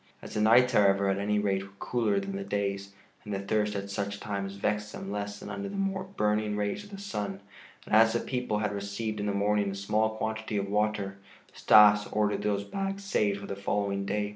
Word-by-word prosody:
As - - -10
the 105 - 0
nights, 125 +4 +5
however, 100 -2 +4
at 95 0 0
any 105 +1 0
rate 100 -2 +1
were 95 0 -12
cooler 110 -4 0
than 100 0 -5
the 100 - -3
days, 100 0 -2 0.3
and 105 - -7
the 100 - -1
thirst 105 +1 0
at 100 0 -4
such 100 0 -3
times 100 -2 -4
vexed 105 +1 -1
them 95 - -6
less 100 0 -4
than - - -8
under 200 0 -4
the 200 - -7
burning 185 - -1
rays 105 - -2
of 205 - -13
the 200 - -8
sun, 105 - -4 0.5
and - - -7
as 110 +1 +6
the 120 - +1
people 125 -5 -2
had 105 -1 -1
received 100 +2 -4
in 105 - -2
the - - +1
morning 100 0 +1
a 100 - -4
small 105 +2 0
quantity 110 -1 -3
of 100 0 -1
water, 105 -2 0 0.4
Stas 105 0 +6
ordered 105 -1 +1
those 100 -1 0
bags 195 - -4
saved 105 - +1
for 100 - -8
the 100 - -5
following 100 0 -1
day. 105 +1 -1
105 Hz, 215 wpm, -29 LUFS, 100-110 Hz, 0.5 s, as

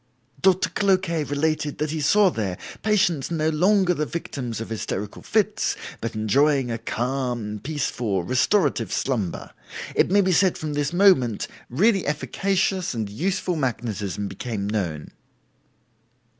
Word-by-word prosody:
"Doctor 185 -1 +3
Cloquet 185 -4 +1
related 150 +1 -1
that 150 0 -1
he 155 -1 -2
saw 195 +6 +4
there, 100 - -3 0.2
patients 190 -10 +1
no 160 -2 0
longer 180 +3 +3
the 150 -2 -2
victims 130 -9 -4
of 115 - -6
hysterical 105 -2 -4
fits, - - +1 0.2
but 115 0 -4
enjoying 130 +4 +2
a 115 - -3
calm, 120 -3 -2
peaceful, 125 - -2
restorative 140 - +1
slumber. 115 -10 -2 0.4
It - - +3
may 200 +2 +5
be 185 -1 +2
said 185 +1 +3
that - - -9
from 155 -1 -3
this 145 -1 -1
moment 175 - +3 0.2
really 195 - +2
efficacious 190 +3 0
and 110 -3 -3
useful 180 - -1
magnetism 110 - -2
became 110 -2 -4
known." 90 -8 -2
145 Hz, 135 wpm, -24 LUFS, 115-180 Hz, 0.4 s, may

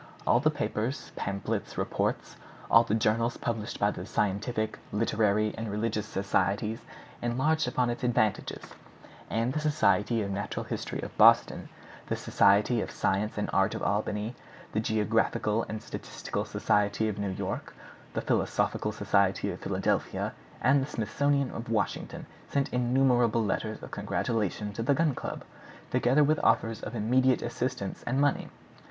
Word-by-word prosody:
All 120 - +4
the 155 +4 +3
papers, 130 -2 -3
pamphlets, 100 0 -3
reports—all 115 - 0
the 110 - +1
journals 115 +2 +1
published 115 -1 -3
by 100 0 +3
the 90 - -7
scientific, 110 +3 -1
literary, 105 0 +1
and 110 -1 -4
religious 105 +1 -2
societies 100 +2 0 0.4
enlarged 135 +6 +1
upon 125 0 +1
its 120 - -6
advantages; 110 -4 0 0.7
and 115 +3 0
the 155 - 0
Society 145 -7 +2
of 100 - -3
Natural 100 +1 -3
History - - -4
of - - -7
Boston, - - +5 0.4
the - - -1
Society 105 +4 +3
of - - -4
Science 105 +3 -1
and 105 - -1
Art 95 0 +2
of - - -5
Albany, 105 +3 -1 0.4
the 110 - 0
Geographical 110 0 +1
and 110 -1 -5
Statistical - - -5
Society 105 +1 +1
of 105 -1 -3
New 100 -1 -1
York, 95 - -4 0.4
the - - 0
Philosophical - - 0
Society - - +1
of - - -7
Philadelphia, - - -1 0.3
and 135 +1 +4
the 135 - -2
Smithsonian 140 +5 0
of 115 0 -6
Washington 105 -4 -2 0.2
sent 140 -1 -1
innumerable 125 -2 +3
letters 100 - -2
of - - -8
congratulation 105 -2 -2
to 115 - -4
the 135 +5 +2
Gun 155 -2 +2
Club, - - -5 0.5
together 135 +5 +4
with 150 +1 +2
offers 110 -1 +2
of 110 - -6
immediate 125 +4 +2
assistance - - -3
and 130 +3 +1
money. 145 0 +1
115 Hz, 145 wpm, -29 LUFS, 105-125 Hz, 0.7 s, Boston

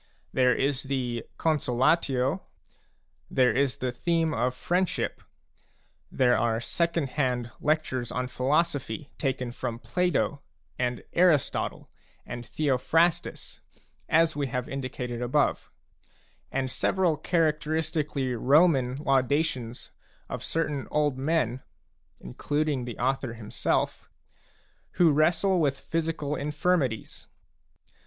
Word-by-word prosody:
There 125 -2 +4
is 135 -1 0
the 125 -4 -2
con 160 -2 +2
solatio; 130 +4 +1 0.9
there 125 -4 +3
is 135 -1 +1
the 125 -1 -2
theme 165 +4 0
of 125 +1 0
friendship; 180 +6 -1 0.9
there 125 -2 +3
are 115 -1 +1
second 170 +2 0
hand 125 -4 -1
lectures 150 -6 0
on 125 0 -1
philosophy 140 0 -1
taken 130 -3 -1
from 120 -1 -4
Plato 175 0 0 0.4
and 125 -1 -1
Aristotle 170 -6 +2 0.4
and 120 0 -6
Theophrastus, 150 +7 0 0.5
as 165 0 +4
we 145 -1 -1
have 125 0 -3
indi 135 -1 -4
cated 120 -2 -5
above; 135 +4 +1 0.8
and 130 -1 -1
several 180 0 +1
characteristically 155 -3 0
Roman 135 0 +4
laudations 135 -3 0 0.4
of - - -5
certain 150 -4 -2
old 145 -3 +1
men 135 -4 0 0.6
(including 145 - -2
the 120 -3 -6
author 130 -2 -1
himself) 110 -2 -2 0.8
who 170 -3 +5
wrestle 170 +5 +3
with 140 -3 +1
physical 160 -3 -2
infirmities. 150 -5 -1
135 Hz, 105 wpm, -27 LUFS, 125-155 Hz, 0.9 s, who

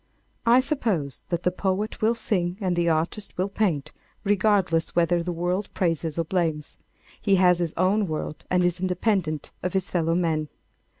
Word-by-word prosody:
I 240 +2 +7
suppose 215 - -1
that 170 -1 -1
the 180 - +2
poet 195 +3 -2
will 225 +2 +3
sing 185 -6 -1
and 185 -4 0
the 170 0 +2
artist 165 +6 -1
will 185 +2 0
paint 185 -9 0 0.3
regardless 195 -5 +2
whether 170 0 +3
the 175 +1 -3
world 180 +4 -1
praises 165 -3 -1
or 165 - +2
blames. 160 -3 -2 0.4
He 200 -2 +3
has 180 -2 +4
his 170 -2 -2
own 195 +3 +2
world 155 -1 -4
and 180 0 +3
is 175 0 +1
independent 185 -4 0
of 180 - -2
his 190 0 -1
fellow 165 -2 +1
men. 160 -3 0
180 Hz, 170 wpm, -25 LUFS, 165-195 Hz, 0.4 s, I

